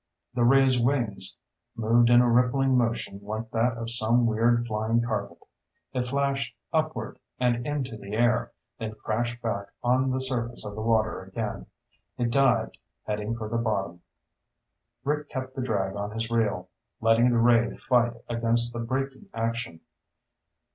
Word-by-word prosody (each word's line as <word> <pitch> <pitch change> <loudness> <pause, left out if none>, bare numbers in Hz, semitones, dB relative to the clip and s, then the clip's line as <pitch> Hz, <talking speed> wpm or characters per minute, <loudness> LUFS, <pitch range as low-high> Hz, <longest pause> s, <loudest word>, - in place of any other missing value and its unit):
The 120 -1 +1
ray's 130 0 +5
wings 115 -7 0 0.4
moved 115 +1 +3
in 120 0 +7
a 125 - +3
rippling 125 +2 +3
motion 115 -5 0
like 110 +2 -5
that 115 +1 +1
of 115 0 -3
some 120 +1 +3
weird 115 +1 +2
flying 110 +1 0
carpet. 115 -2 -3 0.6
It 125 -1 -1
flashed 140 -2 -1 0.2
upward, 155 -1 -1 0.2
and 120 0 +1
into 135 -6 -3
the 100 -1 -9
air, 120 +1 +2 0.3
then 110 -1 -5
crashed 120 +2 -2
back 100 -3 -2 0.2
on 130 +2 +2
the 130 0 0
surface 120 -3 -1
of 105 - -5
the 110 - -5
water 110 -3 +1
again. 105 +3 -5 0.5
It 120 -2 0
dived, 125 -4 +2 0.2
heading 105 +2 -3
for 110 -2 -5
the 115 +2 -2
bottom. 100 -6 -2 1.0
Rick 150 +1 -1
kept 130 0 -5
the 135 - -3
drag 100 -6 -1
on 100 0 -3
his 115 +2 -4
reel, 105 -6 0 0.3
letting 115 +2 +4
the 120 - +2
ray 115 0 +4
fight 120 -2 +1
against 120 0 +2
the 120 - -4
braking 135 +3 -3
action. 115 -6 -3
115 Hz, 155 wpm, -27 LUFS, 110-125 Hz, 1.0 s, in